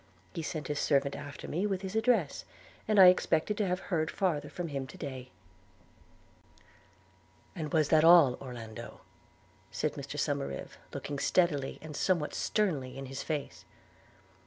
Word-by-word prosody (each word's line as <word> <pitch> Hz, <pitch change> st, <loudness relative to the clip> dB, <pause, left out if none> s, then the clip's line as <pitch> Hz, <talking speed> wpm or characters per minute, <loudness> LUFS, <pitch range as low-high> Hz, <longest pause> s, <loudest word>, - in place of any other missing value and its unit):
He 165 Hz, -, -4 dB
sent 155 Hz, -2 st, -4 dB
his 150 Hz, -1 st, -2 dB
servant 140 Hz, -1 st, +2 dB
after 145 Hz, -1 st, -8 dB
me 180 Hz, +7 st, -1 dB
with 195 Hz, -1 st, -2 dB
his 190 Hz, +2 st, -5 dB
address; 220 Hz, -, +1 dB, 0.4 s
and 215 Hz, -2 st, +3 dB
I 190 Hz, -, +11 dB
expected 180 Hz, +2 st, +2 dB
to 210 Hz, -, +1 dB
have 180 Hz, 0 st, 0 dB
heard 160 Hz, -2 st, +1 dB
farther 175 Hz, -7 st, -1 dB
from 175 Hz, -2 st, -5 dB
him 135 Hz, -2 st, -4 dB
to 185 Hz, -, -12 dB
day.' 130 Hz, -6 st, -6 dB, 2.3 s
'And 155 Hz, -5 st, -4 dB
was 155 Hz, -3 st, +2 dB
that 155 Hz, -1 st, +5 dB
all, 165 Hz, -6 st, +8 dB
Orlando?' 115 Hz, -5 st, -8 dB, 0.7 s
said -, -, -2 dB
Mr -, -, -7 dB
Somerive, 70 Hz, 0 st, -3 dB
looking 145 Hz, -1 st, -5 dB
steadily, 150 Hz, -7 st, +1 dB
and 155 Hz, -1 st, -8 dB
somewhat 170 Hz, -4 st, 0 dB
sternly, 145 Hz, -12 st, -1 dB
in 135 Hz, -, -6 dB
his 135 Hz, +1 st, -6 dB
face. 150 Hz, -3 st, -4 dB
155 Hz, 150 wpm, -31 LUFS, 140-180 Hz, 2.3 s, I